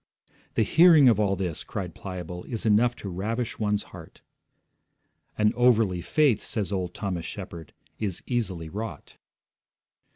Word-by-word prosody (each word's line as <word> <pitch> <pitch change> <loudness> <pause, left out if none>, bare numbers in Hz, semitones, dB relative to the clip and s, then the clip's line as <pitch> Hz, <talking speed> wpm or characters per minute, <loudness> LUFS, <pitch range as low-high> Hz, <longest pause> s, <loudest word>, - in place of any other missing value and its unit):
'The 110 - +3
hearing 160 - +6
of 115 -4 +5
all 100 -2 +2
this,' 90 -4 -4
cried 90 -4 -5
Pliable, 90 -2 -7
'is 115 -2 -4
enough 115 +3 +3
to 105 - -8
ravish 110 +6 -3
one's 105 -1 0
heart.' - - -12 1.2
'An 105 0 +3
overly 115 -7 +3
faith,' 145 - +2
says 105 -3 -2
old 90 -3 -3
Thomas 95 -5 -3
Shepard, 80 -2 -8 0.3
'is 100 -5 -3
easily 100 -10 -2
wrought.' 105 +6 -7
105 Hz, 135 wpm, -26 LUFS, 90-115 Hz, 1.2 s, hearing